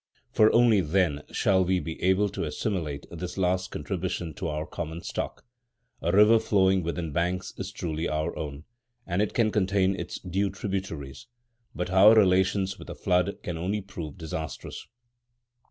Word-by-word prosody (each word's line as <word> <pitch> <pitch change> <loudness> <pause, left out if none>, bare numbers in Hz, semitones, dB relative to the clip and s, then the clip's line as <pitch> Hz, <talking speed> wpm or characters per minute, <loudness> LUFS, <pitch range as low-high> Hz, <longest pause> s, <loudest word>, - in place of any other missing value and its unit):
For 110 - +5
only 115 -4 +5
then 80 -3 +1
shall 95 -2 +2
we 90 0 +1
be 80 -2 -6
able 95 +3 +3
to 100 - -4
assimilate 75 -2 -3
this 90 +2 -6
last 95 0 +1
contribution 90 -3 -3
to - - -4
our 75 0 -3
common 85 0 -6
stock. - - -5 0.6
A 85 - +1
river 105 +4 +6
flowing 95 -4 +3
within 85 -1 -3
banks 90 +4 -1
is 95 0 -5
truly 85 -4 -3
our 75 +2 -2
own, 75 -1 -6 0.4
and 90 +2 0
it 105 - -1
can 110 -3 +3
contain 95 -1 +2
its - - -5
due 95 +2 -1
tributaries; 95 - -5 0.5
but 90 0 -3
our 100 +4 +8
relations 95 -1 +3
with - - -11
a - - -6
flood 90 0 +1
can 85 -2 -4
only 95 +5 -1
prove 85 -7 -8
disastrous. 80 -2 -6
90 Hz, 160 wpm, -27 LUFS, 85-100 Hz, 0.6 s, our